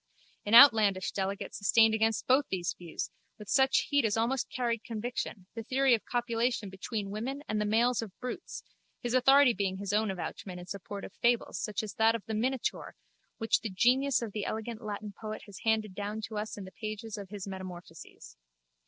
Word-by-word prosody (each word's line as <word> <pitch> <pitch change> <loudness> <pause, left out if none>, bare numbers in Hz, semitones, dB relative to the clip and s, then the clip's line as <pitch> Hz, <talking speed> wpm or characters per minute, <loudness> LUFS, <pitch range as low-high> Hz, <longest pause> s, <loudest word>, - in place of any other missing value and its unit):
An 215 - +4
outlandish 215 -8 +7
delegate 195 0 -3
sustained 220 +2 +4
against 220 0 +1
both 265 +2 +3
these 180 -2 -1
views, 170 -3 -6 0.3
with 210 - -11
such 265 +4 +4
heat 285 -1 +3
as 220 -1 +1
almost 240 +3 0
carried 235 -3 -1
conviction, 230 -3 -4
the 230 - -5
theory 260 +3 +2
of 225 - +1
copulation 235 -3 -1
between 195 +1 -4
women 260 +7 -4
and 215 0 -1
the - - 0
males 235 +3 +2
of 210 -4 -9
brutes, 250 +7 -6 0.4
his 240 0 -2
authority 270 0 +6
being 195 -3 -1
his 200 0 -4
own 215 0 +2
avouchment 185 0 -5
in 175 - -9
support 200 +1 -7
of - - -11
fables 235 0 +1
such 210 0 -2
as 215 - -6
that 225 +1 +3
of 225 - -6
the 220 - -4
Minotaur 250 +4 -2 0.4
which 225 - +1
the 225 - -3
genius 250 +6 +3
of 225 - -5
the 210 0 -3
elegant 220 +2 -4
Latin 210 -1 -5
poet 215 -1 -5
has 205 -3 -11
handed 220 -3 0
down 205 +2 -4
to 220 0 -6
us 210 +1 -4
in 200 - -6
the 185 - -10
pages 215 +1 -6
of 200 -3 -8
his 205 -1 -7
Metamorphoses. 180 - -9
220 Hz, 195 wpm, -30 LUFS, 200-240 Hz, 0.4 s, outlandish